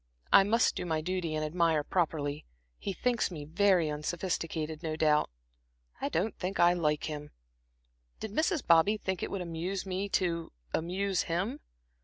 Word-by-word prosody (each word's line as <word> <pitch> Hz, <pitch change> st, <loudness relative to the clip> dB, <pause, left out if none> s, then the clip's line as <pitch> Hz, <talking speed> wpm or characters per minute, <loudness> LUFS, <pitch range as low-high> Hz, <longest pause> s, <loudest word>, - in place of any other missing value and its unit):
I -, -, +10 dB
must 220 Hz, +4 st, +3 dB
do -, -, -3 dB
my 160 Hz, -3 st, 0 dB
duty 175 Hz, -2 st, -2 dB
and 155 Hz, 0 st, -1 dB
admire 165 Hz, -1 st, +2 dB
properly; 150 Hz, -4 st, -1 dB, 0.4 s
he 200 Hz, -, -3 dB
thinks 240 Hz, +4 st, 0 dB
me 155 Hz, -5 st, -7 dB
very 180 Hz, +1 st, +3 dB
unsophisticated, 160 Hz, 0 st, -3 dB
no 160 Hz, -2 st, -2 dB
doubt. 155 Hz, -1 st, +3 dB, 0.7 s
I -, -, 0 dB
don't 185 Hz, +7 st, -1 dB
think 190 Hz, +1 st, -3 dB
I 175 Hz, 0 st, +6 dB
like 150 Hz, -4 st, 0 dB
him. 150 Hz, -1 st, -5 dB, 0.9 s
Did 220 Hz, -, -5 dB
Mrs. 315 Hz, -, 0 dB
Bobby 170 Hz, +6 st, +5 dB
think 190 Hz, -3 st, -3 dB
it -, -, -2 dB
would 195 Hz, -, -3 dB
amuse 175 Hz, +3 st, -3 dB
me 190 Hz, +1 st, -2 dB
to 170 Hz, -3 st, 0 dB, 0.2 s
amuse 185 Hz, +3 st, 0 dB
him? 190 Hz, -, -2 dB
175 Hz, 160 wpm, -31 LUFS, 160-195 Hz, 0.9 s, I